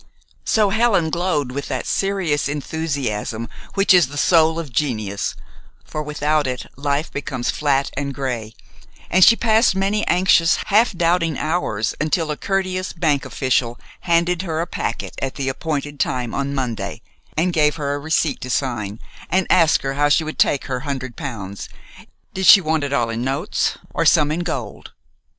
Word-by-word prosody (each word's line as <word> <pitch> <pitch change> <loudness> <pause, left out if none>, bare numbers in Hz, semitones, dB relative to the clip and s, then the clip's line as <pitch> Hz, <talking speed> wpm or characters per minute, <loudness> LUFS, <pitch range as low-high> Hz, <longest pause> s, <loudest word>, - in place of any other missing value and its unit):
So 210 -3 +2
Helen 205 -7 +2
glowed 160 -7 -1
with 140 +2 -4
that - - -3
serious 185 -8 0
enthusiasm 140 -7 -3 0.3
which 195 -1 +4
is 175 -6 +5
the 145 +2 -8
soul 160 +1 +4
of 155 -7 -6
genius, 110 -8 -2 0.5
for 155 - -4
without 150 0 0
it 125 -1 -4
life 145 +3 -1
becomes 130 -3 -3
flat 140 -2 0
and 140 +1 -2
gray, 120 -5 -4 0.6
and 185 +1 +5
she 230 - +8
passed 225 -2 +3
many 200 +2 0
anxious, 175 -2 +4
half 220 +4 +3
doubting 165 -2 +1
hours 115 -11 -1
until 155 +1 0
a - - -2
courteous 185 +1 -2
bank 150 -5 0
official 125 -2 -1 0.2
handed 170 0 +1
her 160 -4 -3
a 170 - 0
packet - - -4
at 135 -1 -3
the 135 -2 -2
appointed 145 0 -4
time 125 -4 -1
on 140 0 -2
Monday, 125 -4 -4 0.3
and 175 +3 +1
gave 150 -2 +3
her 145 -2 -2
a 145 - -3
receipt 160 +2 0
to 130 - -6
sign, 115 -6 -2 0.3
and 190 0 +2
asked 165 -5 +4
her 135 0 -2
how 145 +1 +2
she 155 +3 +3
would 155 0 -6
take 140 - +2
her 130 -1 -3
hundred 130 -3 -5
pounds 105 - -6 0.6
did 190 0 -1
she 200 - +10
want 160 -3 0
it 140 - -3
all 120 -5 +1
in 115 +1 -3
notes 140 - -1 0.2
or - - 0
some 150 -3 +4
in 160 - -1
gold? 140 -11 -5
150 Hz, 170 wpm, -20 LUFS, 135-175 Hz, 0.6 s, she